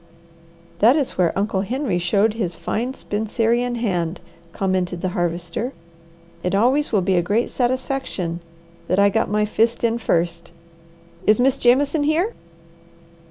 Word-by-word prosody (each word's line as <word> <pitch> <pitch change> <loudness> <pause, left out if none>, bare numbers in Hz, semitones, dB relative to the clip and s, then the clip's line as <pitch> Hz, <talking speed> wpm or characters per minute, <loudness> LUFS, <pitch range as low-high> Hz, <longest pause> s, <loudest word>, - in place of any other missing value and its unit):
"That 235 +6 +6
is 290 -4 -1
where 175 -3 +2
Uncle 195 -1 0
Henry 235 -2 -1
showed 200 +5 +2
his 185 -7 -2
fine 245 +9 -3
Spencerian 230 +3 -1
hand," 180 -7 -1 0.3
commented 185 -2 -1
the 185 - -1
Harvester. 175 +7 -2 0.7
"It 180 +2 -1
always 260 +8 +2
will 210 -4 +3
be 185 0 +2
a - - +4
great 210 +7 0
satisfaction 255 -9 -2 0.5
that 185 - +1
I 200 0 +5
got 225 +2 0
my 210 +1 +1
fist 225 +3 0
in 230 0 +1
first." 170 -5 -1 0.8
"Is 215 +1 +5
Miss 265 +2 +2
Jameson 280 +5 +3
here?" 340 +9 +1
215 Hz, 140 wpm, -21 LUFS, 180-245 Hz, 0.8 s, That